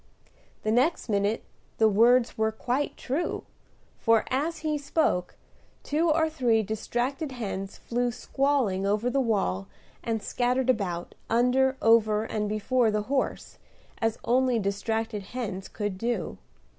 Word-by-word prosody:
The 215 - +1
next 255 +4 +2
minute 205 +1 +1 0.3
the 220 - +5
words 235 +4 +4
were 220 0 +1
quite 250 +6 -2
true; 285 +7 -2 0.6
for, 225 -1 +3
as 305 +6 0
he 305 -1 +1
spoke, 280 - 0 0.5
two 320 +3 +1
or 320 +1 +3
three 245 -8 +2
distracted 245 - -2
hens 195 -5 -5
flew 245 +1 -1
squalling 255 -6 0
over 215 +5 +1
the 275 - +2
wall 95 - 0 0.4
and 225 -2 -2
scattered 250 +1 +1
about, 180 -7 -3 0.2
under, 255 +3 +3
over, 220 -2 +4
and 210 -2 -2
before 225 +3 +2
the 210 0 0
horse, 270 - -2 0.4
as 225 0 0
only 255 0 +2
distracted 220 +1 -2
hens 195 -3 -5
could 205 -3 -4
do. 235 -2 -2
230 Hz, 130 wpm, -27 LUFS, 210-260 Hz, 0.6 s, the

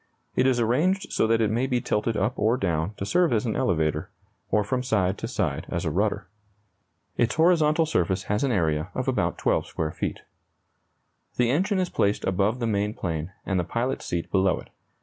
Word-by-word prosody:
It 130 - +3
is 125 -2 +2
arranged 155 - +1
so - - +2
that 115 0 +2
it 110 -2 +2
may 120 +4 +1
be 125 -2 +1
tilted 110 0 -1
up 110 +6 +1
or 110 +4 +2
down 90 0 -1
to 100 - -4
serve 175 - +2
as 115 0 +1
an 110 - -1
elevator, 80 -4 0 0.4
or 105 +1 +2
from 125 +5 -1
side 100 -7 +1
to 115 - -3
side 95 - -2
as - - -2
a - - 0
rudder. - - 0 0.9
Its 120 - +1
horizontal 160 -1 +4
surface 95 - 0
has 105 +4 -1
an 135 - +1
area 80 -7 0
of - - -2
about - - 0
12 - - +1
square 80 -1 -3
feet. - - -4 1.2
The 120 -1 +3
engine 190 +8 +1
is 185 -1 0
placed 100 +1 0
above 100 +5 +1
the 120 - -2
main 105 -1 0
plane 80 -1 -3
and 95 -2 0
the - - +1
pilot's 120 +8 -2
seat 85 -1 -3
below 95 -2 +3
it. - - -13
110 Hz, 200 wpm, -25 LUFS, 95-125 Hz, 1.2 s, horizontal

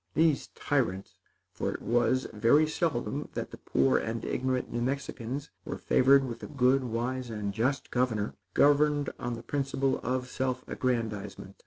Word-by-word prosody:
These 160 -3 +3
tyrants 110 -9 -1 0.4
for - - -2
it - - -5
was 120 +2 +2
very 115 +9 +4
seldom 150 -3 -2
that - - -4
the - - -10
poor 65 -1 +2
and 115 +1 -3
ignorant 130 -1 -1
New 120 - -1
Mexicans 135 0 -3
were - - -5
favored 135 +1 +4
with 115 -2 -6
a - - -6
good, 135 -1 +3
wise 125 +2 -2
and 105 -3 -3
just 130 +6 -1
governor 115 -5 0 0.2
governed 145 0 +4
on 120 - -3
the 115 - -9
principle 135 -1 0
of 125 +1 -2
self 130 0 -2
aggrandizement. 105 -6 -3
125 Hz, 155 wpm, -29 LUFS, 115-140 Hz, 0.4 s, very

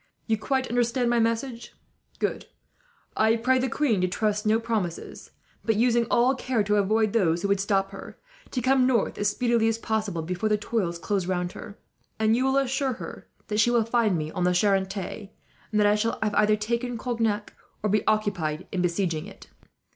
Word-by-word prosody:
"You 225 - +1
quite 260 +4 -1
understand 240 +1 +1
my 240 - +3
message. 230 +1 -2 1.4
I 220 +1 +3
pray 255 +3 +2
the 260 +1 0
queen 230 -8 +1
to 185 - +2
trust 210 +3 0
to 215 - -1
no 220 +1 +3
promises 220 -7 -4 0.3
but, 225 - +1
using 235 +1 +2
all 245 +3 +4
care 255 -4 -1
to 210 +1 +1
avoid 215 +1 +2
those 175 -6 +2
who - - +1
would 200 -1 +2
stop 195 0 0
her, 195 - -10 0.3
to 250 - -2
come 260 0 +4
north 240 -5 +1
as 205 0 +2
speedily 235 +1 +1
as 225 0 +1
possible, 215 -7 -2
before 180 +5 -2
the 210 - +3
toils 205 -5 -2
close 190 +1 -2
round 180 -1 -1
her; 205 +2 -10 0.4
and 220 0 +3
you 255 +2 +1
will 265 +1 +2
assure 270 0 0
her - - -9 0.2
that 210 0 0
she 220 - +4
will 235 -2 +2
find 230 -5 +2
me 155 0 -4
on 180 - -2
the 180 0 +2
Charente, 195 +1 0 0.4
and 215 - 0
that 210 - +4
I 205 - +5
shall 220 +2 0
have 210 -1 -1
either 210 +1 +4
taken 235 +3 -2
Cognac, 225 -3 -2 0.3
or 210 - +1
be 210 -1 +2
occupied 195 -8 0
in 185 - -1
besieging 175 -1 -1
it." 200 - -14
215 Hz, 195 wpm, -26 LUFS, 195-235 Hz, 1.4 s, I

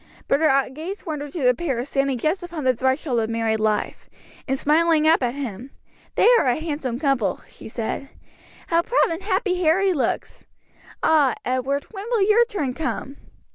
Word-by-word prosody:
But 275 - +2
her 275 -4 +3
gaze 335 +10 -7
wandered 295 -3 -5
to 325 - -3
the 250 0 +5
pair 260 -5 -2
standing 275 -2 0
just 310 +9 0
upon 340 -4 -6
the 255 -1 +3
threshold 260 +1 0
of 220 -1 -1
married 225 -1 0
life; 215 -1 -1 0.4
and 270 0 0
smiling 315 +2 +3
up 320 -1 +4
at 245 0 -1
him, 255 -3 -6 0.5
"They - - +4
are - - +1
a 245 - +3
handsome 290 -6 -3
couple," 265 - 0
she - - -12
said; 235 +4 -4 0.6
"how 335 0 +3
proud 475 -1 +2
and 330 +3 -4
happy 375 -2 0
Harry 365 +4 +3
looks! 290 - -3 0.6
Ah, 295 -5 +4
Edward, 260 +3 -1
when 400 -1 -7
will 460 -5 +2
your 440 +3 +5
turn 345 - -3
come?" 285 -2 -4
285 Hz, 175 wpm, -23 LUFS, 255-335 Hz, 0.6 s, the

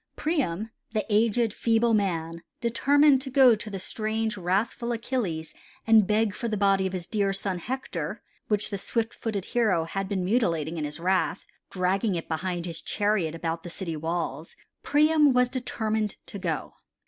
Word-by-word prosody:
Priam, 225 - -1 0.2
the 215 - 0
aged, 225 +1 +2
feeble 230 0 +2
man, 170 -5 0 0.2
determined 275 +4 +4
to 265 - -5
go 260 -2 +6
to 215 0 -4
the 195 - -4
strange, 220 +3 -2
wrathful 205 +6 -1
Achilles 220 -9 -2 0.3
and 220 -3 +6
beg 215 -1 +2
for 235 - -4
the 215 -2 -1
body 195 -1 +3
of 190 - -6
his 180 -2 -3
dear 200 0 0
son 195 -2 -2
Hector, 260 +8 -4 0.2
which 210 0 +1
the 200 - -3
swift 225 +3 -1
footed 205 -5 -3
hero 215 -9 +2
had 195 +4 -4
been 190 -3 -1
mutilating 170 -7 0
in 150 - -2
his 150 +2 -5
wrath, 185 +1 0 0.2
dragging 190 +2 0
it 165 - -4
behind 175 +1 -2
his 165 -2 -4
chariot 205 -6 0
about 165 0 -3
the 175 - -8
city 170 -1 -5
walls. 160 -1 -3 0.3
Priam 300 -1 +4
was 250 0 +3
determined 220 -4 -2
to 200 - -8
go. 165 -6 -3
205 Hz, 170 wpm, -27 LUFS, 175-230 Hz, 0.3 s, go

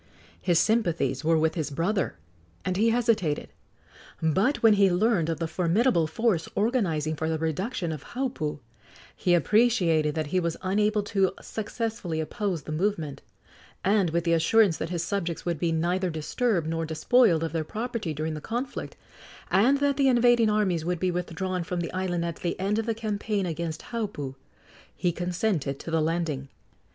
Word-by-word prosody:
His 175 -3 +2
sympathies 215 -7 +1
were 165 +1 +3
with 160 0 +2
his 155 -3 -2
brother, 175 +7 -1 0.5
and 185 - 0
he 220 +4 +3
hesitated; 225 -10 +1 0.7
but 190 - +1
when 225 -1 +7
he 200 -1 +5
learned 180 -3 +2
of 165 - -1
the 165 +1 -2
formidable 175 +2 +2
force 180 -1 0
organizing 180 - 0
for 160 +1 -2
the 160 - 0
reduction 170 - -2
of 150 -3 -6
Haupu, 245 - -3 0.6
he 175 -1 +2
appreciated 175 -7 +3
that 155 -1 -1
he 185 - +4
was 170 -2 -2
unable 210 +2 +1
to 195 -2 +1
successfully 220 -6 -4
oppose 180 - -2
the - - -7
movement, 160 -4 -1 0.6
and, 195 -2 +3
with 170 +1 0
the 170 -1 +2
assurance 170 +2 +4
that 160 - -3
his 170 -2 -2
subjects 170 -3 -3
would 170 -3 -1
be 170 0 +1
neither 175 +3 0
disturbed 170 +4 0
nor 165 0 -1
despoiled 165 +3 +3
of 165 - -2
their 165 -1 0
property 220 - -4
during 155 +1 -3
the 155 - -6
conflict, 245 - -4 0.6
and 245 +9 +4
that 285 -1 +2
the 275 -1 +4
invading 240 -2 +4
armies 195 -6 +1
would 175 0 -1
be 185 +1 +1
withdrawn 180 +1 -2
from 175 +1 -3
the 170 - -4
island 180 -2 -1
at 170 -1 -4
the 175 - -3
end 200 +3 0
of 225 - -3
the 225 - 0
campaign 210 -2 -2
against 165 -1 -4
Haupu, 205 - -3 0.6
he 175 - 0
consented 175 -4 -1
to 165 - -7
the 165 -1 +2
landing. 155 -4 -1
180 Hz, 170 wpm, -27 LUFS, 160-215 Hz, 0.7 s, when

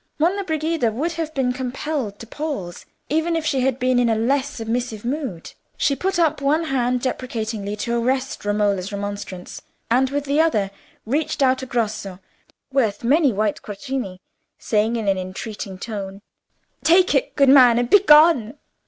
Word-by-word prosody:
Monna 365 +6 +1
Brigida 315 - 0
would 295 +10 -2
have 325 -1 -4
been 255 -2 +1
compelled 255 -3 -3
to 230 - -10
pause, 230 - -5 0.2
even 320 +3 0
if 325 -1 -2
she 275 -3 +1
had 260 -1 +1
been 255 -1 +2
in 240 -1 +2
a 225 - +2
less 265 +5 +1
submissive 230 -2 -4
mood. 255 - -4 0.2
She 280 - +2
put 385 +5 -1
up 320 -5 +2
one 300 +4 +2
hand 250 -4 0
deprecatingly 220 -5 -3
to 235 +2 -1
arrest 260 +2 -1
Romola's 205 -2 0
remonstrance, 200 -2 -6 0.3
and 260 +2 +3
with 285 +1 -2
the 285 +2 +2
other 210 -12 +1 0.3
reached 285 +4 0
out 260 0 +3
a 260 - -6
grosso, 215 -6 -2 0.6
worth 230 -7 +1
many 280 +3 +4
white 210 -1 -1
quattrini, 205 -2 -5 0.4
saying, 220 +2 0
in 225 -3 -3
an 195 -1 +2
entreating 190 +1 -6
tone— 200 -1 -6 0.6
"Take 360 +3 +5
it, - - 0
good 275 -2 +4
man, 250 -4 +7
and 240 0 +1
begone." 300 - +5
250 Hz, 160 wpm, -22 LUFS, 215-290 Hz, 0.6 s, man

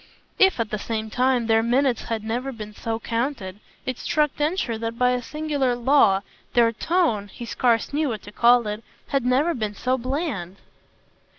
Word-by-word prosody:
If 385 -8 +5
at 225 -2 -1
the 215 - -2
same 220 0 -4
time 255 -1 +2
their 225 0 +3
minutes 245 +2 +1
had 225 -2 -3
never 245 +5 -2
been 215 -3 -8
so 225 +2 -3
counted 230 -5 -3 0.3
it 255 -1 -3
struck 300 -3 +1
Densher 300 -5 -1
that 230 0 -4
by 250 0 +3
a 250 0 0
singular 285 -2 -1
law 240 -6 +4 0.3
their 235 -1 +5
tone 265 - 0
he 235 +4 -9
scarce 235 +2 +1
knew 300 0 +1
what 220 -3 -5
to 205 - -10
call 240 +2 +4
it 210 +1 -4 0.3
had 275 -2 +1
never 265 +7 +2
been 215 -5 -3
so 255 +5 0
bland. 255 - -3
240 Hz, 180 wpm, -24 LUFS, 225-270 Hz, 0.3 s, If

